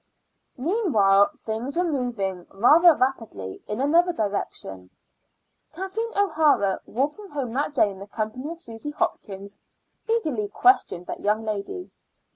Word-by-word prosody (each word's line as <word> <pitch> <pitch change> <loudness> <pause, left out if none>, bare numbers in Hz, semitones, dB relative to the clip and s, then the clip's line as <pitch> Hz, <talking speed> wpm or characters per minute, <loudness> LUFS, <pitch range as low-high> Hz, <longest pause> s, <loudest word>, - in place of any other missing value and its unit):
Meanwhile 250 - +3 0.2
things 230 +7 -3
were 355 - +3
moving 235 - -2
rather 310 - +6
rapidly 225 - -2
in 210 +2 -3
another 335 +6 +4
direction. 200 - -4 0.8
Kathleen 385 +7 -4
O'Hara, 300 - +3
walking 295 - -2
home 270 -7 -4
that 290 +3 -1
day 210 -6 +4
in 190 - -11
the 200 - -9
company 220 +7 -4
of 335 - -6
Susy 230 -3 -7
Hopkins, 200 -8 -4 0.5
eagerly 305 - 0
questioned 205 - +2
that - - -6
young 210 +2 0
lady. 220 - -4
250 Hz, 125 wpm, -25 LUFS, 205-330 Hz, 0.8 s, rather